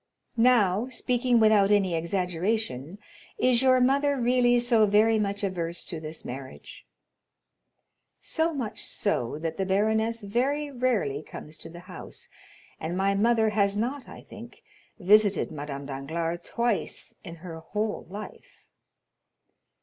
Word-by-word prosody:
"Now, 230 -2 +3
speaking 245 -1 +1
without 215 -3 +5
any 200 -4 +3
exaggeration, 180 - -2 0.4
is 250 -1 +3
your 260 -1 +5
mother 280 +3 +2
really 245 0 +3
so 235 -3 +4
very 215 +2 +4
much 200 0 -2
averse 175 -3 -3
to 165 - -5
this 155 0 -7
marriage?" 130 +1 -9 1.3
"So 325 0 0
much 255 -8 -4
so 145 - -1
that 160 0 -4
the 190 - -1
baroness 220 +3 +1
very 275 +8 -1
rarely 235 - 0
comes 155 0 -10
to 165 - -7
the 170 +1 -11
house, 180 -1 -8 0.5
and 170 +3 -3
my 195 +1 +2
mother, 220 +2 +3
has 200 -1 +1
not, 250 +4 -3
I - - -11
think, - - -12 0.3
visited 205 0 +4
Madame 145 -2 -6
Danglars 165 +5 -4
twice 235 -3 -1
in 170 -3 -8
her 165 -1 -9
whole 210 +5 -3
life." 205 +3 -10
205 Hz, 130 wpm, -27 LUFS, 170-235 Hz, 1.3 s, without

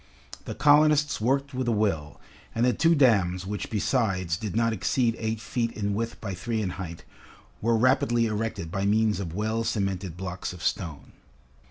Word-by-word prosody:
The - - -5
colonists 150 -2 +4
worked 135 +4 0
with 130 -1 -2
a - - +3
will, 95 - -1 0.4
and 115 - +2
the 125 - +3
two 165 +2 +3
dams 95 - +3
which 100 0 -4
besides 100 -7 0
did 105 +3 -5
not 115 0 +2
exceed 115 +4 +1
eight 110 -1 -2
feet 115 +1 -2
in 100 -1 -2
width 115 +3 -3
by 100 -3 -5
three 110 +5 -3
in 100 -4 -1
height, 85 -3 -7 0.6
were 115 +1 +2
rapidly 120 -1 +3
erected 105 -6 -3
by 100 +1 -2
means 110 0 +2
of 85 -4 -5
well 110 +2 -1
cemented 95 -5 -2
blocks 90 -1 -5
of 90 - -10
stone. 80 -6 -3
110 Hz, 175 wpm, -26 LUFS, 95-120 Hz, 0.6 s, colonists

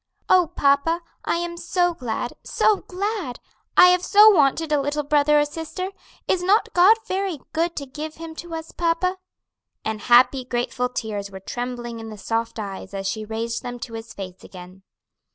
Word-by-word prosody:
"Oh, 365 -2 +5
papa, 285 +5 +2 0.2
I - - +1
am 340 0 -3
so 350 +1 +1
glad, 245 -4 -4
so 430 - +2
glad! 380 - -4 0.4
I 360 - +9
have 360 0 +3
so 420 +3 +7
wanted 310 -2 +2
a 295 -1 +3
little 290 +2 -1
brother 295 +1 +3
or 295 - +3
sister. 325 +5 -5 0.4
Is 365 - +1
not 395 +5 +2
God 380 +6 +6
very 380 -5 -2
good 335 +1 0
to 280 - -4
give 300 +4 -7
him 325 0 -8
to 345 -1 -6
us, 320 0 -7
papa?" 350 +2 0 0.7
And 220 -1 -3
happy, 255 +3 +5
grateful 250 0 -2
tears 210 -5 -4
were 190 -1 -9
trembling 240 +2 -5
in 225 0 -8
the 215 - -9
soft 230 +3 -2
eyes 200 -2 -6
as 195 0 -3
she 215 +2 -3
raised 225 +1 -3
them 245 -1 -6
to 230 - -7
his 225 +1 -7
face 190 -4 -9
again. 185 +1 -12
285 Hz, 180 wpm, -23 LUFS, 230-345 Hz, 0.7 s, I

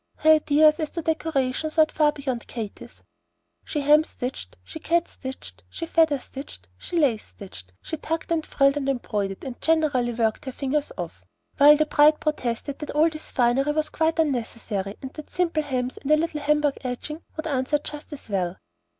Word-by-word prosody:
Her 315 - +4
ideas 305 0 +5
as 310 -2 -1
to 335 - -5
decoration 310 -3 0
soared 310 0 +3
far 300 -1 +3
beyond 265 -5 -4
Katy's. 220 -4 -8 0.6
She 295 - -3
hem 300 +2 +6
stitched, 255 -4 -6
she 320 - -9
cat 340 +2 +1
stitched, 260 0 -9
she 335 - -5
feather 320 -3 +3
stitched, 260 - -10
she 345 - -5
lace 255 -9 +2
stitched, 95 - -12
she 320 - -4
tucked 325 +2 -4
and 325 -2 +1
frilled 275 -1 +2
and 275 -1 -1
embroidered, 205 -7 -2
and 260 -3 -7
generally 295 -7 +2
worked 225 +1 0
her 260 - -4
fingers 280 +3 -2
off; 165 - -6 0.3
while 295 +2 +8
the 310 - +3
bride 300 0 +6
vainly - - -24
protested 275 -2 -2
that 300 - -6
all 315 +2 +3
this 310 0 -6
finery 260 +4 +2
was 305 0 0
quite 320 +1 +1
unnecessary, 230 -9 -2
and 265 - -6
that 305 - -9
simple 335 -3 0
hems 255 -3 -3
and 275 - -6
a 305 - +6
little 315 -1 -1
Hamburg 295 -1 +1
edging 265 +5 -5 0.2
would 315 - -4
answer 280 -1 +1
just 295 +1 -8
as 295 - -9
well. 185 -3 -1
290 Hz, 185 wpm, -25 LUFS, 250-310 Hz, 0.6 s, while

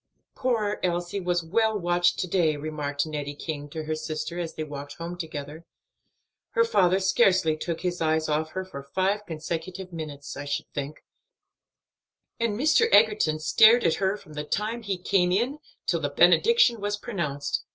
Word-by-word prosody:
"Poor 225 -5 -1
Elsie 175 +2 -1
was 175 -2 0
well 220 +6 +1
watched 175 -1 +2
to 185 - -2
day," 165 -4 +2
remarked 145 -1 -3
Nettie 145 -2 -5
King 145 -1 -5
to 160 +1 -5
her 155 +1 -2
sister 155 +2 -4
as 170 -2 -4
they 155 - -3
walked 145 -1 -7
home 170 +1 -6
together; 155 -2 -7 0.9
"her 465 -2 +4
father 190 - +3
scarcely 190 -4 +3
took 165 +1 -4
his 180 -1 -2
eyes 160 0 +1
off 155 +1 -1
her 185 0 -3
for 140 -7 -8
five 190 +8 -1
consecutive 170 +3 -5
minutes, 150 -3 -7
I 145 - -6
should 145 +2 -3
think; 145 +1 -5 1.4
and 230 -2 -1
Mr. 315 - +4
Egerton 210 -8 +4
stared 220 +9 +6
at 165 - +3
her 195 +2 +1
from 155 -6 -15
the 150 0 -4
time 215 +9 -2
he 200 -4 -3
came 180 0 +1
in 245 +10 0 0.3
till - - +1
the - - -1
benediction 455 - +4
was 205 0 -1
pronounced." 170 -11 -3
175 Hz, 170 wpm, -26 LUFS, 155-205 Hz, 1.4 s, stared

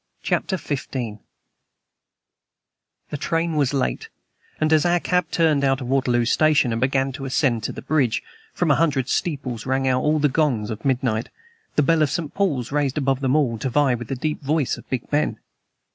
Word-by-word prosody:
CHAPTER 190 - 0
XV 145 -6 -4
THE 115 -5 -4 2.0
train 165 +1 -1
was 145 -4 +2
late, 130 - -2 0.5
and 155 0 +2
as 155 -2 +4
our 175 0 +3
cab 180 -1 0
turned 155 -4 +2
out 135 -1 +2
of 125 -2 -6
Waterloo 125 -3 +2
Station 150 0 +3
and 115 - -2
began 135 +1 +1
to 135 +1 -7
ascend 130 -3 +1
to - - -2
the - - -9
bridge, 135 -8 +1 0.3
from 175 -4 +1
a - - +5
hundred 145 -6 +1
steeples 130 -8 -2
rang 135 0 +1
out 130 0 +2 0.2
the - - +6
gongs 130 -7 0
of 110 - -6
midnight, 125 -4 0 0.5
the 150 - +3
bell 165 +3 +3
of 150 - +3
St. 160 -1 -3
Paul's 145 - -1
raised 145 -1 0
above 135 -2 +1
them 135 0 +1
all 125 -7 +1
to 130 - -2
vie 140 0 +3
with 120 -1 -5
the 135 - -3
deep 150 +4 -3
voice 145 -1 0
of - - -14
Big 130 -2 -3
Ben. 150 +1 +1
135 Hz, 190 wpm, -22 LUFS, 125-155 Hz, 2.0 s, the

